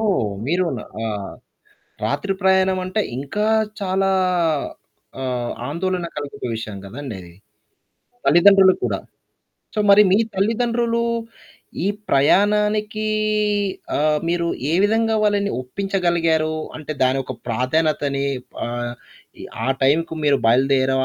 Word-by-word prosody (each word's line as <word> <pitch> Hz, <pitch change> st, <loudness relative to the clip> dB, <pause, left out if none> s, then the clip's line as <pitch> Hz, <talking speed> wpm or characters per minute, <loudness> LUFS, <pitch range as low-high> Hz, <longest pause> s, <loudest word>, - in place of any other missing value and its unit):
ఓహ్! 200 Hz, -, +1 dB, 0.2 s
మీరున 165 Hz, -3 st, 0 dB, 0.3 s
ఆహ్, 105 Hz, -3 st, -4 dB, 0.7 s
రాత్రి 200 Hz, -1 st, -1 dB
ప్రయాణమంటే 190 Hz, +1 st, +2 dB, 0.2 s
ఇంకా 205 Hz, +11 st, -2 dB, 0.3 s
చాలా 195 Hz, 0 st, +1 dB, 1.1 s
ఆహ్, 125 Hz, -2 st, -2 dB, 0.2 s
ఆందోళన 180 Hz, +3 st, -2 dB
కలిగిన 145 Hz, -3 st, -6 dB
విషయం 105 Hz, -2 st, -6 dB
గదండది! 100 Hz, -6 st, -8 dB, 0.9 s
తల్లిదండ్రులు 190 Hz, +5 st, +6 dB
కూడా. -, -, 0 dB, 0.8 s
సో, 215 Hz, -, -2 dB
మరి 200 Hz, +1 st, +8 dB
మీ 195 Hz, -, +5 dB, 0.2 s
తల్లిదండ్రులు 235 Hz, +3 st, +1 dB, 0.8 s
ఈ -, -, +2 dB, 0.2 s
ప్రయాణానికీ 210 Hz, +8 st, +2 dB, 0.9 s
ఆహ్, 150 Hz, 0 st, +2 dB
మీరు 170 Hz, 0 st, 0 dB, 0.2 s
ఏ -, -, +1 dB
విధంగా 225 Hz, +1 st, +2 dB
వాళ్ళని 205 Hz, -1 st, +1 dB
ఒప్పించగలిగారూ? 165 Hz, 0 st, 0 dB, 0.2 s
అంటే 155 Hz, -1 st, -6 dB
దాని 130 Hz, +1 st, +2 dB
యొక్క 130 Hz, 0 st, -6 dB
ప్రాధాన్యతని 140 Hz, +3 st, 0 dB, 0.4 s
ఆహ్, 120 Hz, 0 st, -3 dB, 0.7 s
ఆ -, -, -2 dB, 0.2 s
టైంకి 160 Hz, +5 st, +2 dB
మీరు 145 Hz, -2 st, +4 dB
బయలుదేర 130 Hz, +2 st, +3 dB
170 Hz, 100 wpm, -21 LUFS, 135-200 Hz, 1.1 s, మరి